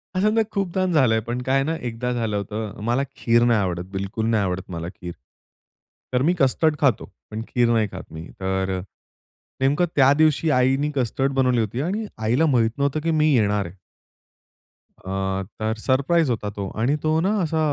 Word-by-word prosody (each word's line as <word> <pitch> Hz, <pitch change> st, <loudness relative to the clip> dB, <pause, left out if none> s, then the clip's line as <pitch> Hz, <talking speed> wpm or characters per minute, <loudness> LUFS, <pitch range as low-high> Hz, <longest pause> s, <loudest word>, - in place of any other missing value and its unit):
असं 205 Hz, +3 st, +3 dB
ना 225 Hz, -, +3 dB
खूपदा 190 Hz, -2 st, -1 dB
झाल 130 Hz, -7 st, +4 dB
आहे, 110 Hz, -, +2 dB
पण 120 Hz, +3 st, -4 dB
काय 135 Hz, +2 st, +1 dB
ना, 160 Hz, +3 st, -1 dB
एकदा 125 Hz, -1 st, -4 dB
झालं 115 Hz, -3 st, -1 dB
होतं. 105 Hz, +1 st, -5 dB
मला 120 Hz, +4 st, +1 dB
खीर 115 Hz, 0 st, +3 dB
नाही 120 Hz, -2 st, +3 dB
आवडत, 90 Hz, -3 st, -2 dB
बिलकुल 100 Hz, +3 st, -3 dB
नाही 110 Hz, -3 st, +2 dB
आवडत 95 Hz, 0 st, -3 dB
मला 85 Hz, -1 st, -4 dB
खीर. 85 Hz, -1 st, -7 dB, 1.0 s
तर 125 Hz, -, +2 dB
मी 165 Hz, +6 st, +3 dB
कस्टर्ड 150 Hz, +3 st, +3 dB
खातो 130 Hz, -8 st, +2 dB, 0.3 s
पण 110 Hz, +1 st, -4 dB
खीर 120 Hz, -1 st, +2 dB
नाही 110 Hz, -3 st, +2 dB
खात 95 Hz, -3 st, -9 dB
मी. 80 Hz, +1 st, -7 dB
तर 95 Hz, 0 st, -1 dB
अ, -, -, -5 dB, 0.8 s
नेमकं 145 Hz, +6 st, +3 dB
त्या 135 Hz, -1 st, +6 dB
दिवशी 155 Hz, +1 st, +2 dB
आईनी 135 Hz, +3 st, +2 dB
कस्टर्ड 135 Hz, +1 st, 0 dB
बनवली 130 Hz, -2 st, +2 dB
होती. 110 Hz, +4 st, -2 dB
आणि 200 Hz, +8 st, -2 dB
आईला 115 Hz, +8 st, +2 dB
माहीत 120 Hz, -7 st, +2 dB
नव्हतं, 140 Hz, +2 st, 0 dB
की 165 Hz, -, +1 dB
मी 155 Hz, -1 st, +3 dB
येणार 105 Hz, -3 st, +2 dB
आहे. 85 Hz, +2 st, -9 dB, 1.2 s
अ, 95 Hz, 0 st, -3 dB, 0.2 s
तर 110 Hz, 0 st, 0 dB
सरप्राईज 140 Hz, +6 st, +2 dB
होता 110 Hz, -3 st, -2 dB
तो 100 Hz, -1 st, -4 dB
आणि 125 Hz, +6 st, +2 dB
तो 155 Hz, 0 st, +2 dB
ना 190 Hz, -, +1 dB
असा 160 Hz, -2 st, 0 dB
120 Hz, 185 wpm, -23 LUFS, 105-145 Hz, 1.2 s, त्या